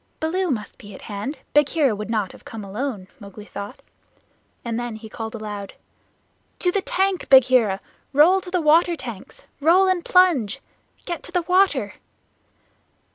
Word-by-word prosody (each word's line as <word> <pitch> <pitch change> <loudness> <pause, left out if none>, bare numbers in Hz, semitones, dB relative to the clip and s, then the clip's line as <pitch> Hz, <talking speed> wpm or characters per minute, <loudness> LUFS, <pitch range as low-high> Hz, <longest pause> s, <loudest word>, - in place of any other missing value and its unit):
"Baloo 360 +3 -1
must 220 -7 -4
be 205 -1 -11
at - - -13
hand; 215 +8 -5 0.2
Bagheera 295 -4 +3
would 210 +1 -6
not 215 -4 -1
have - - -16
come 225 -2 -8
alone," 210 -1 -4
Mowgli 205 0 -11
thought. 200 -1 -8 0.8
And 235 0 -2
then 240 -2 -4
he 220 0 -10
called 225 0 -6
aloud: 210 -2 -7 0.8
"To 360 - +1
the 400 - 0
tank, 380 0 -1
Bagheera. 250 -7 +5 0.3
Roll 335 +7 +5
to 360 - -9
the 360 -1 0
water 330 +3 +4
tanks. 235 -9 -9 0.2
Roll 345 +6 +5
and 370 -2 +1
plunge! 280 - +3 0.5
Get 345 -2 -4
to - - -10
the 355 -2 0
water!" 375 +3 +2
265 Hz, 155 wpm, -22 LUFS, 215-350 Hz, 0.8 s, Bagheera